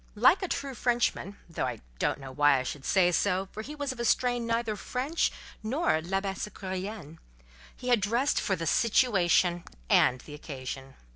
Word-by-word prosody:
Like 260 - +5
a 375 - -1
true 280 -5 -3
Frenchman 240 -5 0
(though 165 - -2
I - - -4 0.2
don't - - 0
know 135 -1 -8
why 145 0 +4
I 130 - -1
should 135 +1 -6
say 180 -2 +4
so, 190 +1 +1
for 215 - -6
he 290 +7 -8
was 285 -2 -2
of 235 -2 -2
strain 245 -1 +1
neither 230 -1 0
French 265 +9 -1 0.3
nor 220 - +1
Labassecourien), 195 -1 -4 0.6
he 250 - -5
had 240 -4 +4
dressed 235 +7 +1
for 195 - 0
the 165 -1 -4
"situation" 180 - +3 0.3
and 125 - +5
the 150 - -11
occasion. 135 -2 -7
200 Hz, 165 wpm, -29 LUFS, 165-245 Hz, 0.6 s, Like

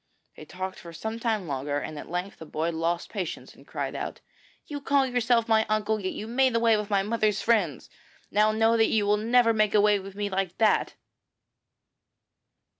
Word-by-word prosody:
They 155 - -11
talked 185 +4 -6
for 170 -1 -11
some 220 +7 -5
time 220 -5 -1
longer, 145 0 -2
and 150 +1 -5
at - - -10
length 180 +3 -4
the 160 - -8
boy 160 +3 -2
lost 165 +1 -1
patience 185 -6 -5
and - - -19
cried - - -4
out: - - -5 0.5
'You 290 -1 -6
call 275 0 +2
yourself 245 -2 +1
my 220 -1 +4
uncle, 215 0 0
yet 185 -2 -3
you 215 - -6
made 250 +2 +2
away 230 -1 +4
with 210 -1 -3
my 200 -2 +2
mother's 215 -1 0
friends. 200 - +1 0.4
Now 210 +1 +3
know 225 +1 +3
that 225 - +3
you 215 -2 +2
will 205 +1 +3
never 230 +2 +3
make 215 -1 +2
away 210 0 +4
with 195 0 -10
me 205 0 -2
like 190 -2 -2
that.' 220 -1 +2
210 Hz, 190 wpm, -27 LUFS, 185-225 Hz, 0.5 s, my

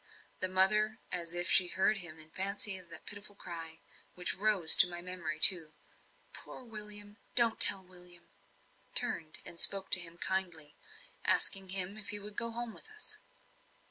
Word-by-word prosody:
The 185 - 0
mother, 210 +4 +1
as 170 -1 -4
if 175 +1 -1
she 185 - +5
heard 190 +4 -1
in 160 -4 -9
fancy 195 +2 -1
that 170 -2 -12
pitiful 205 0 -10
cry, 165 -3 -10 0.3
which 180 - -1
rose 195 -5 +3
to 180 - +6
my 175 0 -7
memory 175 -4 -7
too 160 -3 +5 0.6
"Poor - - -12
William! 210 -2 -9 0.2
don't 235 -2 +4
tell 195 -1 +9
William!" 180 -1 -14 0.7
turned 245 -11 -2
and 170 - -8
spoke 195 +1 +5
to - - +5
him 170 -1 -9
kindly, 175 -6 -4 0.5
asking 195 -1 0
him 190 +2 -1
if 205 -1 -10
he 205 - 0
would 205 0 -9
go 230 +1 -3
home 235 0 -8
with 435 - -12
us. 430 0 -8
190 Hz, 160 wpm, -30 LUFS, 175-210 Hz, 0.7 s, tell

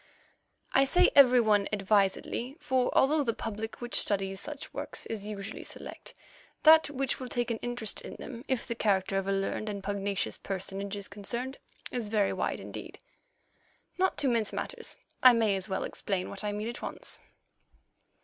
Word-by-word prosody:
I 270 - +6
say 355 +7 +5
every 255 -3 +8
one 210 -3 +3
advisedly, 210 +6 +1
for 255 -5 +1
although 295 +2 +4
the 230 -4 -1
public 220 +1 -5
which 240 0 -6
studies 195 -1 +1
such 295 -2 -7
works - - -4
is 210 -2 -5
usually 200 -2 -6
select, - - -8 0.5
that 315 -1 +8
which 275 -2 -1
will 255 - -5
take 240 0 -1
an 225 - -2
interest 240 -3 -3
in - - -8
them, 240 -2 -8
if 260 -3 0
the - - -2
character 195 -3 +1
of 195 - -5
a - - +1
learned 195 +2 -1
and 200 -1 -5
pugnacious 200 -1 -2
personage 195 +1 -4
is 200 -1 -5
concerned, 235 +6 -5 0.3
is 235 -4 -3
very 210 -2 +2
wide - - -1
indeed. - - -8 1.0
Not 375 0 +2
to 285 - 0
mince 230 -4 +1
matters, - - -5 0.2
I 255 -1 +9
may 220 -4 +3
as 190 +1 -4
well 190 - -1
explain 190 -3 -3
what 200 - -4
I 210 - -1
mean 210 +2 -3
at 240 - -7
once. - - -4
220 Hz, 175 wpm, -30 LUFS, 200-255 Hz, 1.0 s, I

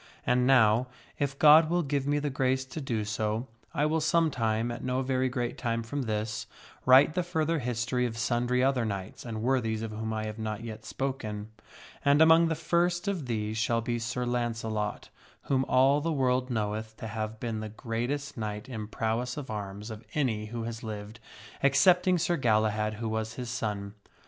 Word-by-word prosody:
And 125 0 +3
now, 120 -2 +5 0.3
if 140 -1 -1
God 155 +2 +7
will 175 +1 +2
give 140 -1 -1
me 145 0 +2
the 145 -1 -1
grace 130 0 +1
to 130 +4 -7
do 115 -6 -2
so, 110 +2 -1 0.3
I 150 -2 +1
will 160 +1 +1
some 165 0 +3
time, 115 -1 0
at 120 - -6
no 130 +1 0
very 130 0 +1
great 125 -1 -3
time 115 -2 -1
from 140 +5 -3
this, 110 -2 -3 0.4
write 135 +4 +7
the 180 - +1
further 165 -2 0
history 125 0 -1
of 115 -1 -6
sundry 120 +2 +1
other 130 -2 +2
knights 100 -3 -4
and 110 -2 -4
worthies 115 -4 +1
of 110 - -4
whom 110 +1 -4
I 110 0 -2
have 110 +1 -6
not 110 0 -4
yet 110 -1 -7
spoken. 110 -2 -4 0.5
And 140 +1 +4
among 160 +1 +7
the 160 - 0
first 175 +3 +1
of 180 -9 -2
these 110 -1 -2
shall 115 0 +1
be 120 +1 -2
Sir 115 +2 -2
Launcelot, 115 -3 -2 0.3
whom 135 -1 +1
all 135 +3 +4
the 165 +2 -1
world 130 -3 +1
knoweth 110 -1 -3
to - - -7
have 110 0 -4
been 115 -2 -3
the 110 0 -5
greatest 120 +6 -3
knight 105 +1 -4
in 110 -5 -5
prowess 115 +4 -2
of 140 -5 -5
arms 105 +1 -5
of 110 +1 -8
any 115 -8 0
who 115 +1 -5
has 115 0 -5
lived, 110 0 -7 0.4
excepting 180 +7 +5
Sir 175 +1 +1
Galahad, 110 -3 +1
who 115 +1 -4
was 110 +1 -2
his 125 -2 -5
son. 100 -3 -3
120 Hz, 190 wpm, -29 LUFS, 110-135 Hz, 0.5 s, God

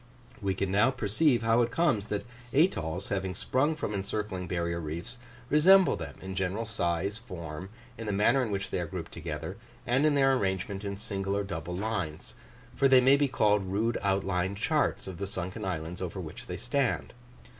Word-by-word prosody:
We 95 -1 0
can 95 -1 -1
now 105 +6 +4
perceive 120 +2 +2
how 115 +1 +4
it 120 - +2
comes 120 -9 +1
that 105 -1 -2 0.3
atolls, 95 - +1
having 95 -2 -2
sprung 145 +10 +1
from 125 -8 -3
encircling 100 -2 -3
barrier 85 -1 -1
reefs, 85 +10 -6 0.3
resemble 180 +7 +6
them - - -7
in 95 0 -5
general 95 +4 -1
size, 100 -1 -1
form, 90 -6 -7 0.3
in 115 - -5
the - - 0
manner 110 +7 +4
in 120 - -1
which 100 -1 -3
they - - 0
are 85 - -2
grouped 85 0 -6
together, 80 +2 -5 0.3
and 125 +4 +2
in 155 -1 +4
their 135 -1 +5
arrangement 95 -3 -1
in 100 -1 -4
single 100 -2 -2
or 100 - 0
double 90 -2 -5
lines; 95 -7 -3 0.4
for 135 - +4
they 130 -1 +7
may 130 +2 +6
be 140 0 +3
called 105 -6 +2
rude 110 +4 +1
outline 95 -1 0
charts 150 +8 0
of 95 -3 -7
the 100 - -2
sunken 95 -1 -4
islands 85 -1 -4
over 95 +1 -4
which 80 -2 -8
they 90 - -4
stand. 125 +5 -1
100 Hz, 190 wpm, -29 LUFS, 90-120 Hz, 0.4 s, they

